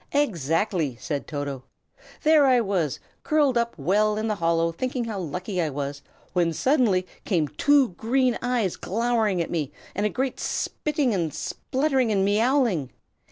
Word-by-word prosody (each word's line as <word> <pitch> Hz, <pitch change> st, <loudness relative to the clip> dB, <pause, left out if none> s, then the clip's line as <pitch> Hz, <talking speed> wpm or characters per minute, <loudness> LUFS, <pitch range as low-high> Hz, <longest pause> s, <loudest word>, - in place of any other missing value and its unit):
"Exactly!" 170 Hz, -, 0 dB
said 145 Hz, -4 st, -4 dB
Toto. 145 Hz, -3 st, -4 dB, 0.6 s
"There 305 Hz, -3 st, +5 dB
I 255 Hz, -2 st, +5 dB
was, 190 Hz, -, -1 dB, 0.2 s
curled 295 Hz, -4 st, +2 dB
up 235 Hz, -3 st, 0 dB
well 210 Hz, +8 st, +2 dB
in 215 Hz, +1 st, -1 dB
the 215 Hz, -, +1 dB
hollow, 165 Hz, 0 st, +2 dB
thinking 250 Hz, +7 st, -3 dB
how 215 Hz, -3 st, -4 dB
lucky 180 Hz, +3 st, -3 dB
I 160 Hz, -, 0 dB
was, 140 Hz, 0 st, -4 dB, 0.3 s
when 170 Hz, -2 st, +2 dB
suddenly 230 Hz, -, +2 dB, 0.2 s
came 165 Hz, -7 st, +1 dB
two 285 Hz, -, +3 dB
green 240 Hz, +6 st, +1 dB
eyes 245 Hz, -7 st, 0 dB
glowering 220 Hz, -3 st, 0 dB
at -, -, -8 dB
me, 155 Hz, -6 st, -2 dB, 0.2 s
and 205 Hz, -, -2 dB
a 210 Hz, -, +2 dB
great 260 Hz, +4 st, -2 dB
spitting 295 Hz, -5 st, -1 dB
and 170 Hz, -5 st, -1 dB
spluttering 265 Hz, -, -1 dB
and 195 Hz, -2 st, +2 dB
meowling. 215 Hz, -, +2 dB
210 Hz, 155 wpm, -25 LUFS, 165-250 Hz, 0.6 s, There